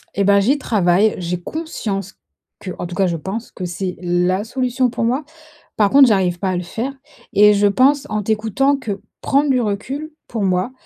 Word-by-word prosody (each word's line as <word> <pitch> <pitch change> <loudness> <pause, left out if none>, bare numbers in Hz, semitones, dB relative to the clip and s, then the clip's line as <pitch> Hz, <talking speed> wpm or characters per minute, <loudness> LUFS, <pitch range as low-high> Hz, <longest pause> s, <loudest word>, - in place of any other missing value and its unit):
Et 200 - +1
bah, 200 +1 +5
j'y 250 +9 +2
travaille, 205 -5 +2
j'ai 180 0 -3
conscience 205 - -4 0.5
qu'en 185 -2 -6
tout 175 - -8
cas, 190 0 +2
je 170 - -1
pense 200 +8 -6
que 180 - -6
c'est 180 +1 -4
la 180 +2 +1
solution 255 +1 0
pour 235 - -3
moi. 250 +6 0 0.5
Par 205 -2 +4
contre, 275 +2 +7
j'arrive 185 -4 +1
pas 190 0 -1
à 185 - -1
le 180 - -3
faire 235 +9 -4 0.4
et 210 +1 +6
je 205 0 +3
pense 265 +7 +3
en 215 0 -1
t'écoutant 225 +6 +1
que 205 -7 -5 0.2
prendre 280 +1 +2
du 255 -2 +3
recul 250 +9 -3 0.2
pour 220 -4 -3
moi, 185 +4 0
205 Hz, 195 wpm, -19 LUFS, 185-255 Hz, 0.5 s, contre